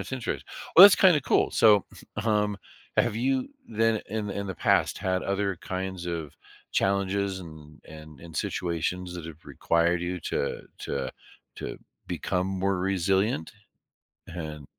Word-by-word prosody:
That's - - -7
interest 125 -3 -3 0.3
Well, 185 - +12
that's 200 - +10
kinda 180 -6 +5
cool - - +2
so, 105 -3 +5 0.4
um, 105 -2 +1 0.4
have 105 - +2
you 130 +2 0 0.2
then 115 0 +1
in 105 0 -3
the 100 - -4
in 100 - -3
the 95 - -4
past - - +2
had 95 0 -1
other 100 -1 -1
kinds 95 -1 -4
of 80 -4 -4 0.4
challenges 100 0 0
and 75 -3 -12
and 75 -2 -12
and 85 -1 -10
situations 90 +1 -2
that 85 -2 -7
have 80 +1 -11
required 85 +1 +1
you 90 0 -3
to 70 - -2 0.2
to - - -3 0.5
to - - -6 0.3
become 90 0 -1
more 95 0 0
resilient 95 -1 0 0.8
and 75 -4 -7
95 Hz, 145 wpm, -27 LUFS, 85-105 Hz, 0.8 s, Well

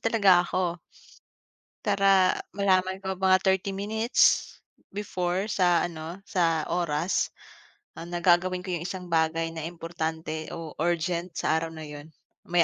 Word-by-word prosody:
talaga 200 -6 +4
ako 175 -1 -1 1.1
para 195 -3 +4 0.2
malaman 190 -1 +1
ko 190 0 -3
mga 190 0 +5
30 190 0 +1
minutes 220 +4 +2 0.4
before 185 -1 -2
sa 175 -4 +3
ano 165 +2 -8
sa 165 -3 +2
oras, 170 0 0 0.7
na 165 - -6 0.2
gagawin 180 +1 +3
ko 185 - -4
'yung 170 - -2
isang 185 -1 -5
bagay 165 0 +1
na 160 -1 -5
importante 160 -2 -4
o 165 -2 -7
urgent 170 +1 0
sa 160 - +1
araw 165 - -3
na 160 -1 -8
'yun, 150 +1 -10 0.4
may 175 -1 +5
175 Hz, 135 wpm, -27 LUFS, 165-190 Hz, 1.1 s, mga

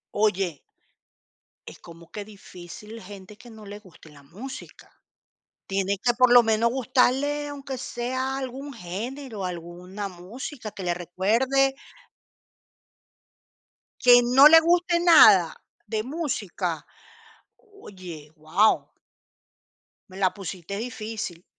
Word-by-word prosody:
Oye 195 -7 0 1.1
es - - -11
como 170 0 -15
que 205 -1 -7
difícil 210 +2 -12
gente 200 +1 -12
que 240 - -15
no 220 -2 -13
le 205 +1 -9
guste 180 -5 -18
la 140 -1 -17
música. 225 - -11 0.8
Tiene 195 0 -1
que, 240 -1 +3
por 250 -1 +4
lo 245 - +9
menos, 225 +1 +1
gustarle 265 +3 +1
aunque 275 -2 -7
sea 260 +2 -3
algún 270 +2 -6
género, 220 +3 -6
alguna 180 +3 -7
música 215 - -8
que 195 - -9
le 175 -1 0
recuerde 230 +10 +1 2.3
¿Que 245 -1 +7
no 260 +4 +7
le 325 +1 +8
guste 345 +1 +2
nada 215 - +6 0.3
de 215 0 -2
música? 205 - -4 0.7
Oye, 185 - -12
guau. 155 +8 +1 1.2
Me 185 - -12
la 190 -2 +1
pusiste 195 -1 -7
difícil. 220 -6 -6
215 Hz, 110 wpm, -25 LUFS, 185-260 Hz, 2.3 s, lo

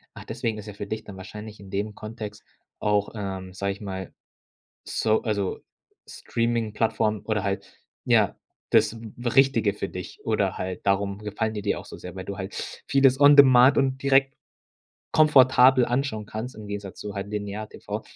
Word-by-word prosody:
Ach, - - -10
deswegen 115 -1 -3
ist 105 - -8
ja 105 - -7
für 100 0 -7
dich 110 +1 -4
dann 100 - -10
wahrscheinlich 105 +3 -9
in 100 -1 -12
dem 105 +2 -3
Kontext 110 -1 -8 0.4
auch, 105 -1 +1
ähm, 95 -2 -5
sag 100 +1 -2
ich 100 - -8
mal 95 -2 -6 0.7
so 110 0 0
also, 100 -4 -1 0.5
Streamingplattformen 110 -2 -1
oder 105 -3 -1
halt 100 0 -4 0.2
ja, - - +3 0.3
das 115 - +3 0.3
Richtige 120 -4 +3
für - - -4
dich - - -8
oder - - 0
halt 95 +1 -5
darum 100 0 +1
gefallen 105 +1 -3
die 105 - -4
dir 100 - 0
auch - - -11
so - - -10
sehr, 90 - -9
weil 95 0 -6
du 100 0 -6
halt 95 0 -6
vieles 135 -1 +4
on 145 0 +8
demand 130 -1 +7
und 135 0 0
direkt 135 0 +3 0.8
komfortabel 130 -4 +6
anschauen 120 -4 -1
kannst 115 +5 -6
im 110 -1 -10
Gegensatz 100 -2 -6
zu 105 -1 -6
halt 100 0 -4
Linear-TV, 105 0 -5
105 Hz, 170 wpm, -25 LUFS, 100-120 Hz, 0.8 s, on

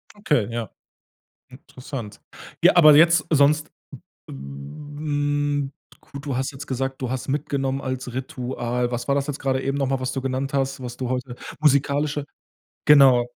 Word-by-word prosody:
Okay, 150 - +1
ja. 115 -3 -4 0.8
Interessant. 130 -3 -9 0.4
Ja, - - +6
aber 155 -3 +9
jetzt 170 0 +5
sonst 150 0 +3 0.6
w - - -10
hm, 145 - -3 0.3
gut, 140 0 -10
du 140 -3 -2
hast 130 +2 -1
jetzt 135 0 -9
gesagt, 135 +1 -3
du 125 - -2
hast 130 -2 -4
mitgenommen 135 -1 -1
als 130 -1 -4
Ritual. 125 -1 -3
Was 120 0 -3
war 140 - +2
das 140 0 -1
jetzt 145 -1 -4
grade 130 -1 0
eben 135 +1 -1
noch 135 -2 0
mal, 135 -1 0
was 130 0 -2
du 135 - -3
genannt 135 +2 -2
hast, 135 0 -1
was 120 -1 -7
du 125 -2 -3
heute 125 -1 -3 0.2
musikalische 145 0 +2 0.6
genau. 135 -4 +7
135 Hz, 160 wpm, -23 LUFS, 125-145 Hz, 0.8 s, aber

